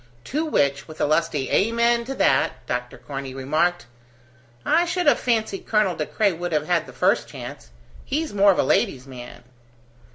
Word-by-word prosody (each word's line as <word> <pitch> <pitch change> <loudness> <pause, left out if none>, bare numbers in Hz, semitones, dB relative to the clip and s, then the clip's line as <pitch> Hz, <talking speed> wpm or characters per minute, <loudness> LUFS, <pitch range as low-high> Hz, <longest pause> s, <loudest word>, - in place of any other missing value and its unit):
To 300 - -2
which, 140 - +1
with 155 -1 -11
a - - +2
lusty 150 -3 0
"Amen 235 +2 +2
to 270 +2 -5
that," 130 - +1
Dr. 125 0 -4
Corney 135 -2 -7
remarked: 155 +7 0 0.8
"I 335 +2 +4
should 355 0 -1
have 290 - +4
fancied 220 -5 -1
Colonel 210 -5 +2
De 155 - -3
Craye 205 -3 +1
would 175 0 -4
have 150 - +1
had 170 -2 0
the - - -10
first - - +1
chance: - - -9 0.3
he's 305 -2 -2
more 200 0 +5
of 185 - -1
a - - +3
lady's 130 -1 +1
man." 125 -3 -11
175 Hz, 175 wpm, -23 LUFS, 140-230 Hz, 0.8 s, more